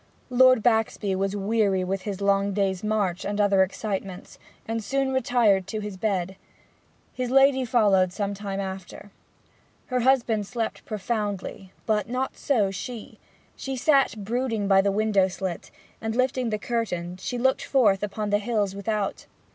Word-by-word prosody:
Lord 255 -2 +5
Baxby 220 -4 +1
was 195 +1 -1
weary 200 -2 +1
with 190 +1 -2
his 200 0 -5
long 200 0 +2
day's 190 -1 0
march 205 -4 0
and 205 +1 -3
other 200 -2 +4
excitements, 190 -1 -3 0.3
and 225 0 -2
soon 270 +4 0
retired 230 -7 +2
to 210 -1 -5
bed. 190 -3 -1 0.8
His 250 -1 -3
lady 270 0 +4
followed 205 -7 +3
some 200 +1 -2
time 200 -1 -5
after. 190 +1 -7 0.8
Her 250 - +3
husband 235 -5 +2
slept 230 -1 -4
profoundly, 205 -3 -4
but 215 0 0
not 255 +2 -2
so 215 -9 +1
she; 225 +4 -7 0.4
she 270 0 -5
sat 270 -3 +3
brooding 230 -2 -1
by 195 -1 +5
the 200 0 +1
window 205 -2 +2
slit, 185 -2 -5 0.3
and 220 0 -3
lifting 255 -1 +1
the 215 - -1
curtain 185 -6 -3
looked 260 +2 +1
forth 210 -8 +3
upon 210 0 -3
the 205 - +3
hills 210 -3 -1
without. 200 0 -3
210 Hz, 145 wpm, -25 LUFS, 195-235 Hz, 0.8 s, Lord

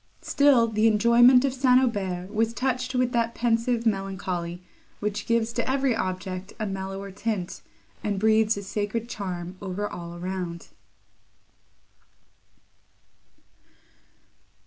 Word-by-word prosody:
Still 280 -5 +4
the 220 0 +2
enjoyment 235 +4 +6
of 270 - 0
St. 255 -1 +4
Aubert 195 -6 -2
was 225 +1 0
touched 255 0 -1
with 250 -1 +2
that 235 -1 0
pensive 235 0 +1
melancholy, 185 -4 -2 0.4
which 210 -1 -3
gives 230 0 +1
to 240 +1 -2
every 265 -2 +1
object 185 -1 -4
a 215 - -1
mellower 195 0 -5
tint, 205 -2 -3 0.4
and 205 -2 -1
breathes 220 0 +3
a 200 - -5
sacred 210 +3 -3
charm 185 -5 -5
over 200 +1 -3
all 170 -2 -8
around. 175 -1 -5
215 Hz, 115 wpm, -26 LUFS, 190-235 Hz, 0.4 s, enjoyment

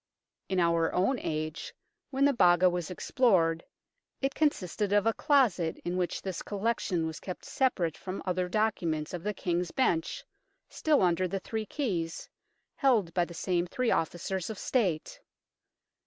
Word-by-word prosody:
In 190 -1 +1
our 170 -1 +2
own 200 +8 +2
age, 155 +1 -4 0.3
when 275 0 +2
the 285 - +4
Baga 180 -5 +5
was 175 -1 -3
explored, 180 -5 +2 0.6
it 270 0 -1
consisted 210 - 0
of 205 0 +3
a 225 - +3
closet 220 - +2
in 175 +1 -1
which 180 -1 -2
this 190 -3 -4
collection 200 -5 -1
was 160 0 -5
kept 185 - -7
separate 185 - 0
from 190 +1 -6
other 180 -1 -1
documents 175 -7 0
of 175 - -4
the 210 +3 -3
King's 175 -1 -1
Bench, 165 -11 0 0.4
still 300 -8 +2
under 180 +1 +2
the 195 +2 -3
three 220 +3 -4
keys, 175 - -3 0.5
held 225 - +2
by 175 -1 +2
the 170 - -11
same 175 0 0
three 250 +4 0
officers 175 +3 -1
of 220 - -5
State. 185 -12 -1
185 Hz, 155 wpm, -29 LUFS, 170-220 Hz, 0.6 s, Baga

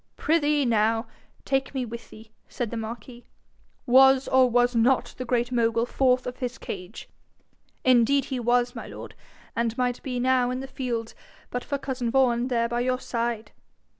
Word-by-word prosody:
'Prithee, 300 -2 +2
now, 225 0 +2 0.4
take 270 0 -1
me 255 -2 -1
with 235 0 -9
thee,' 220 0 -14 0.2
said 240 -4 -4
the - - -4
marquis. 235 +2 -7 0.6
'Was, 265 +1 +6
or 260 -1 +5
was 245 +1 +2
not 245 +3 +2
the 255 - -3
Great 240 0 0
Mogul 230 -1 +1
forth 255 0 +1
of 250 0 -5
his 250 -1 -4
cage?' 185 +2 -8 0.8
'Indeed 255 +2 +4
he 260 -2 -3
was, 245 +1 +1
my 230 - -7
lord, - - -9 0.4
and 230 0 -1
might 250 -1 -1
be 250 -2 -3
now 250 0 +2
in 255 +1 -3
the 265 - -5
fields 245 -4 -4 0.4
but 245 - -3
for 285 - -2
cousin 255 -3 -3
Vaughan 245 -1 +2
there 235 -2 +1
by 240 +1 -2
your 255 +1 0
side.' 230 -3 -3
245 Hz, 170 wpm, -25 LUFS, 235-260 Hz, 0.8 s, Was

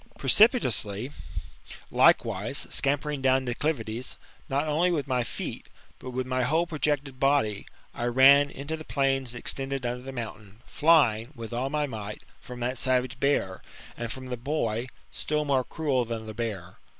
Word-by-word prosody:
Precipitately, 125 - +3 0.8
likewise, - - +3
scampering 145 0 0
down 130 0 +3
declivities, 120 -2 -2 0.3
not 140 +3 0
only 160 +4 +2
with 150 -5 -1
my 125 -2 +1
feet, - - -6 0.3
but 130 - -7
with 130 0 -2
my 130 0 -1
whole 160 +7 +2
projected 145 -4 -1
body, 135 -7 +1 0.3
I 120 - -3
ran 135 +4 +6
into 145 +4 -5
the 155 - -8
plains 135 -4 0
extended 135 +2 -2
under 120 +1 -2
the 135 +1 -7
mountain, 110 -3 -8
flying, 140 -7 +3
with 115 -1 -7
all 125 +3 -1
my 150 +1 0
might, 105 -5 -7 0.2
from 125 -1 -9
that 125 +2 -2
savage 130 0 0
bear, 100 -9 0 0.3
and 115 -1 -4
from 130 0 -7
the 125 -1 -4
boy, 120 -3 -2 0.2
still 150 0 -1
more 135 -3 +2
cruel 140 -4 0
than 115 -1 -5
the 110 - -7
bear. 105 -6 -5
130 Hz, 155 wpm, -27 LUFS, 120-145 Hz, 0.8 s, ran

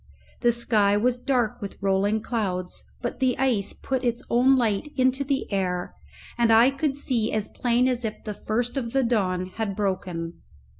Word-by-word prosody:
The 240 - +4
sky 215 -4 +2
was 245 +3 +1
dark 245 -4 0
with 200 - -6
rolling 200 +2 +1
clouds, 185 -7 -3 0.2
but - - -3
the 255 -2 +2
ice 240 -7 +1
put 265 -1 -3
its 240 -1 -1
own 255 +3 +5
light 230 +2 0
into 260 +1 +2
the 275 0 -1
air, 180 -2 -1 0.5
and 235 -1 +4
I 230 +4 +6
could 275 0 -1
see 240 -6 -1
as 215 -1 -1
plain 245 +1 +1
as 250 -1 -1
if 215 -1 -4
the 210 - -4
first 240 +6 -2
of 235 -4 -3
the 270 -1 +3
dawn 190 -6 0
had 215 -3 -2
broken. 180 -4 -3
230 Hz, 180 wpm, -25 LUFS, 200-250 Hz, 0.5 s, I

